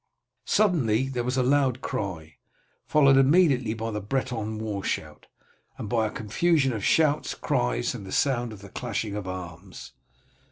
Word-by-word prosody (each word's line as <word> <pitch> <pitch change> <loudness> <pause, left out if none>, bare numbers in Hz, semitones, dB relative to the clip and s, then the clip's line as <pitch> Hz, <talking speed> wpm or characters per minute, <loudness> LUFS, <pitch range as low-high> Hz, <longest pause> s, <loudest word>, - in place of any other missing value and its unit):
Suddenly 135 - +2
there 125 -3 -2
was 125 +2 -2
a 130 - +3
loud 130 -1 +2
cry, 90 - -5 0.5
followed 140 -3 +5
immediately 135 -5 +4
by 115 0 -4
the 105 -1 -3
Breton 110 -1 -3
war 105 -3 -4
shout, - - -4 0.5
and - - -6
by 110 -1 +1
a - - -4
confusion 135 +7 +1
of 105 -3 -4
shouts, 155 -2 +2
cries, - - -1
and - - -7
the 95 - -9
sound 120 -2 +1
of 100 -2 -11
the 100 - -10
clashing 110 -2 -4
of 105 -3 -5
arms. 90 0 -8
115 Hz, 160 wpm, -26 LUFS, 100-135 Hz, 0.5 s, followed